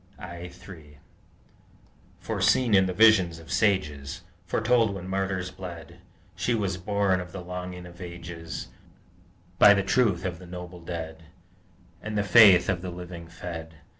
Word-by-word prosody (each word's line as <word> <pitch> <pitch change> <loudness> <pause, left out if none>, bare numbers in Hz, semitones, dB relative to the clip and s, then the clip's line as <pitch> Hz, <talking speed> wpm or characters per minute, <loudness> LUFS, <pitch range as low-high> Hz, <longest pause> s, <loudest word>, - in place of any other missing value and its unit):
I 85 -1 -8
3 80 -5 -13 1.2
Foreseen 125 -4 +1
in 95 -1 +5
the - - -1
vision 110 -2 +6
of 80 - -12
sages, 75 -7 0 0.2
Foretold 110 +1 +2
when 90 -1 -7
martyrs 95 -1 -2
bled, 85 -3 -9 0.4
She 120 +6 0
was 95 -4 -1
born 100 0 +1
of 90 0 -9
the 95 - -7
longing 90 0 -7
of 85 +1 -13
ages, 85 -1 -7 0.9
By 105 0 +8
the 100 - +1
truth 95 -2 +1
of 90 -2 -3
the 90 - -12
noble 90 0 -8
dead 80 -1 -7 0.8
And 110 +1 -4
the 105 - +2
faith 100 -3 +7
of 95 -3 0
the 90 - -5
living 85 -1 -8
fed! 80 -1 -8
90 Hz, 145 wpm, -26 LUFS, 85-100 Hz, 1.2 s, By